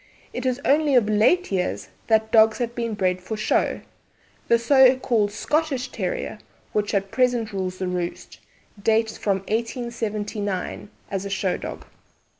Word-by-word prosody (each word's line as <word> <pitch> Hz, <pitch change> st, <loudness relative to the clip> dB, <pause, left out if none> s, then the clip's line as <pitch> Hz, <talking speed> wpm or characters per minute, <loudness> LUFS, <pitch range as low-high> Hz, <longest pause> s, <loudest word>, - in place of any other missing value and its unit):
It 250 Hz, +1 st, -2 dB
is 255 Hz, +1 st, 0 dB
only 290 Hz, 0 st, +3 dB
of 235 Hz, -4 st, +4 dB
late 220 Hz, -, +3 dB
years 185 Hz, -2 st, -2 dB, 0.2 s
that 220 Hz, -1 st, +2 dB
dogs 220 Hz, -1 st, +5 dB
have 235 Hz, -2 st, -2 dB
been 230 Hz, -2 st, -3 dB
bred 185 Hz, -2 st, 0 dB
for 220 Hz, +4 st, -5 dB
show. 215 Hz, -, 0 dB, 0.7 s
The 235 Hz, -, +5 dB
so 260 Hz, +2 st, +5 dB
called 220 Hz, -5 st, +1 dB
'Scottish' 280 Hz, +3 st, -1 dB
Terrier, -, -, -4 dB, 0.3 s
which 210 Hz, -1 st, 0 dB
at 195 Hz, 0 st, -1 dB
present 245 Hz, -4 st, +1 dB
rules 185 Hz, -1 st, -3 dB
the 185 Hz, -, -3 dB
roost, 180 Hz, -1 st, -4 dB, 0.4 s
dates 220 Hz, +1 st, +2 dB
from 195 Hz, -2 st, -1 dB
1879 215 Hz, -4 st, -3 dB, 0.2 s
as 195 Hz, -1 st, -2 dB
a 200 Hz, -, -5 dB
show 195 Hz, -1 st, 0 dB
dog. -, -, -7 dB
220 Hz, 150 wpm, -23 LUFS, 200-245 Hz, 0.7 s, dogs